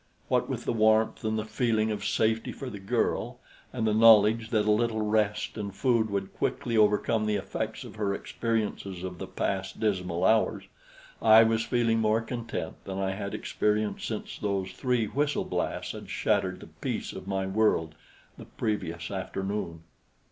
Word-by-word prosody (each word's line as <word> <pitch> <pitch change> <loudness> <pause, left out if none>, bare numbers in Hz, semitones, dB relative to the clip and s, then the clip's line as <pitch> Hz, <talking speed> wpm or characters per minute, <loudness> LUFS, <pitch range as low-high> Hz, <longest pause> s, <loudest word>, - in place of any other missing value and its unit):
What - - +1
with - - -4
the - - 0
warmth 110 0 +3
and 110 0 0
the 110 - -2
feeling 110 0 +1
of 105 -2 -3
safety 110 0 +1
for 135 -2 -7
the 100 - -7
girl, 95 - -1 0.3
and 120 -3 -2
the 110 - +2
knowledge 110 0 +6
that 110 -2 +2
a 105 - +3
little 110 0 +1
rest 105 0 0
and 100 -2 -5
food 115 -3 +2
would 100 -1 -3
quickly 115 - -2
overcome 105 +1 +3
the 105 - +1
effects 100 - -4
of - - -11
her 105 -2 0
experiences 105 -4 -3
of 90 -1 -6
the - - -5
past 95 -1 -3
dismal 90 -4 0
hours, 110 +2 +3 0.6
I 110 +1 +8
was 115 0 +2
feeling 115 -2 +2
more 110 +1 +2
content 115 -7 -5
than 95 -1 -5
I 95 0 0
had 100 0 -4
experienced 105 0 -1
since - - -5
those 100 -2 -1
three 125 -3 0
whistle 145 +6 0
blasts - - -2
had - - -9
shattered - - 0
the - - -9 0.2
peace - - -3
of 95 - -9
my 95 -1 -1
world 95 -5 +1 0.5
the - - -9
previous 85 -6 -3
afternoon. 95 -3 -4
105 Hz, 170 wpm, -28 LUFS, 100-110 Hz, 0.6 s, I